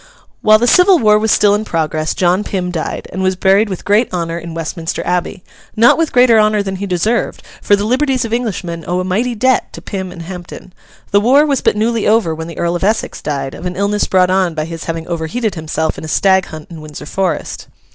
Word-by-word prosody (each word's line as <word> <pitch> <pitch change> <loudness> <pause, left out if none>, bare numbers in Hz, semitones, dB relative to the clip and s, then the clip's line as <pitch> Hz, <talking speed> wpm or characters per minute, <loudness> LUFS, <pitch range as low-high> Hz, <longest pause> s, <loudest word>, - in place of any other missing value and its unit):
While 215 0 +6
the 235 - 0
Civil 360 +8 +5
War 210 -6 +4
was 220 0 +1
still 205 -1 +4
in 210 +1 0
progress, 155 -4 -2
John 180 +2 +1
Pym 180 -3 -3
died, 165 -3 -4
and 190 - -3
was 185 0 +1
buried 195 +3 +3
with 190 - -6
great 210 +4 +2
honour 170 -2 -3
in 170 -1 -8
Westminster 165 0 -4
Abbey—not 185 +5 0
with 325 -1 0
greater 245 -3 +5
honour 215 -1 +2
than 195 -1 -4
he 200 +1 -4
deserved, 205 +6 -1 0.2
for 205 - +3
the 200 +1 -2
liberties 260 +1 +1
of 225 - -5
Englishmen 180 -8 -3
owe 180 +1 -1
a - - -1
mighty 225 +7 -1
debt 260 +3 +1
to - - -8
Pym 190 -2 -5
and 170 -2 -9
Hampden. 180 +1 -9 0.4
The 200 - +4
war 270 +7 +4
was 280 -4 0
but - - +1
newly 225 0 0
over 210 -6 +2
when 160 +1 -6
the 170 - -9
Earl 170 0 -1
of 175 - -3
Essex 215 +3 -1
died, 140 -2 -3
of 180 - -6
an 180 - -5
illness 200 +2 0
brought 185 -1 +3
on 185 -3 +1
by 155 -1 -2
his 165 0 -7
having 165 -1 -4
overheated 175 +7 -2
himself 160 -1 -3
in - - -10
a - - -6
stag 190 +3 +2
hunt 155 +1 -10
in 165 -2 -9
Windsor 150 -1 -9
Forest. 190 +3 -3
190 Hz, 225 wpm, -15 LUFS, 170-215 Hz, 0.4 s, While